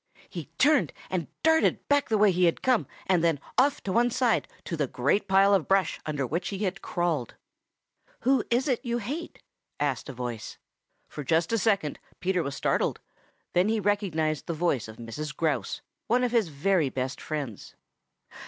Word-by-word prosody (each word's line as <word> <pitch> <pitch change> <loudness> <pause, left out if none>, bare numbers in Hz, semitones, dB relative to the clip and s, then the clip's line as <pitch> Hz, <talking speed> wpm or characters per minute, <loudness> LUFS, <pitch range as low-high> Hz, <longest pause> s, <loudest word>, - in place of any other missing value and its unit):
He 170 -4 -6
turned 295 0 +4 0.2
and 175 -5 -1 0.2
darted 320 0 +3
back 285 0 +2
the 220 - +3
way 210 -1 +5
he 180 0 +3
had 170 - +1
come 255 -3 +2 0.2
and 180 -3 +2
then 165 -4 +2 0.2
off 280 +2 +3
to 195 - -2
one 240 +4 +3
side 245 -1 +1 0.2
to 170 - -4
the 150 -3 0
great 140 +13 +1
pile 195 +1 +5
of 190 -5 +2
brush 195 -3 +2
under 145 -3 -1
which 170 +8 -2
he 200 +1 -4
had 195 0 -2
crawled. 170 -8 -1 0.9
"Who 265 -2 +3
is 245 +4 +2
it 255 -2 0
you 240 -2 -1
hate?" 280 +10 -5 0.4
asked 140 -3 -1
a - - -5
voice. 120 -3 -5 0.5
For 150 - -7
just 165 +7 +1
a 230 - +3
second 195 -8 +1 0.2
Peter 185 -1 +1
was 140 -3 -4
startled, - - 0 0.5
then 180 +4 +3
he 220 0 +1
recognized 180 -7 0
the 170 - -2
voice 155 -9 0
of 110 0 -11
Mrs. 150 +6 -6
Grouse, 160 -2 -1 0.3
one 245 +2 +3
of 245 - +1
his 230 -5 +3
very 155 +1 +1
best 130 0 -3
friends. 140 -9 -5
180 Hz, 180 wpm, -27 LUFS, 150-225 Hz, 0.9 s, way